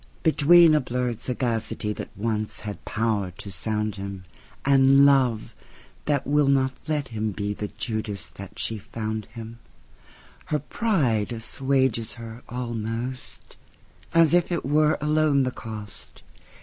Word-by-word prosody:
Between 165 Hz, +1 st, +6 dB
a 150 Hz, -, +4 dB
blurred 125 Hz, -2 st, -2 dB
sagacityThat 115 Hz, -4 st, -2 dB
once 110 Hz, 0 st, -2 dB
had 105 Hz, -1 st, -7 dB
power 105 Hz, -3 st, 0 dB
to 100 Hz, -, -8 dB
sound 105 Hz, +2 st, -2 dB
him, 100 Hz, -1 st, -6 dB, 0.4 s
And 135 Hz, 0 st, +6 dB
Love, 130 Hz, -6 st, +3 dB, 0.5 s
that 145 Hz, -3 st, +1 dB
will 145 Hz, 0 st, +3 dB
not 135 Hz, -1 st, +3 dB
let 150 Hz, -3 st, -1 dB
him 110 Hz, -2 st, -2 dB
beThe 105 Hz, 0 st, -3 dB
Judas 110 Hz, -4 st, -2 dB
that 100 Hz, -1 st, -11 dB
she 110 Hz, -1 st, -1 dB
found 110 Hz, 0 st, -5 dB
him, 115 Hz, 0 st, -8 dB, 0.9 s
Her 150 Hz, -, 0 dB
pride 145 Hz, -, 0 dB
assuages 120 Hz, -1 st, 0 dB
her 115 Hz, 0 st, -9 dB
almost, 120 Hz, +1 st, -5 dB, 0.5 s
As 165 Hz, -2 st, +5 dB
if 175 Hz, 0 st, +3 dB
it 170 Hz, -, -1 dB
were 150 Hz, +2 st, +3 dB
alone 150 Hz, -2 st, +3 dB
the 130 Hz, -, -1 dB
cost. 110 Hz, -4 st, -9 dB
120 Hz, 125 wpm, -25 LUFS, 110-140 Hz, 0.9 s, Between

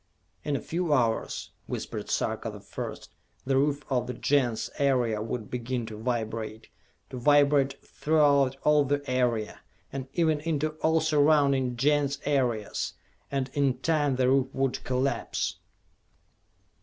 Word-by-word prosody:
"In 145 Hz, -, -1 dB
a -, -, -2 dB
few 170 Hz, -2 st, -1 dB
hours," 115 Hz, -4 st, -1 dB, 0.2 s
whispered -, -, -5 dB
Sarka -, -, -1 dB
the -, -, -9 dB
First, -, -, -7 dB, 0.3 s
"the 135 Hz, 0 st, +1 dB
roof 145 Hz, +1 st, +1 dB
of 125 Hz, -3 st, 0 dB
the 125 Hz, -, -4 dB
Gens 125 Hz, -4 st, +1 dB
area 125 Hz, -6 st, +2 dB
would 110 Hz, 0 st, -5 dB
begin 125 Hz, 0 st, -2 dB
to 110 Hz, -1 st, -8 dB
vibrate, 110 Hz, -2 st, -3 dB, 0.4 s
to 130 Hz, -, -5 dB
vibrate 140 Hz, 0 st, +4 dB
throughout 140 Hz, -4 st, +2 dB
all 150 Hz, -1 st, +5 dB
the 140 Hz, +1 st, -1 dB
area, 125 Hz, -4 st, 0 dB, 0.3 s
and 135 Hz, -1 st, -4 dB
even 160 Hz, -3 st, +2 dB
into 155 Hz, -1 st, -1 dB
all 160 Hz, 0 st, +3 dB
surrounding 145 Hz, -5 st, +3 dB
Gens 145 Hz, +1 st, +2 dB
areas 125 Hz, -7 st, 0 dB, 0.4 s
and 135 Hz, -1 st, -2 dB
in 140 Hz, -3 st, +1 dB
time 145 Hz, -1 st, +1 dB
the 130 Hz, 0 st, +2 dB
roof 135 Hz, 0 st, +3 dB
would 135 Hz, -1 st, -1 dB
collapse!" 130 Hz, +2 st, -1 dB
135 Hz, 135 wpm, -28 LUFS, 125-145 Hz, 0.4 s, all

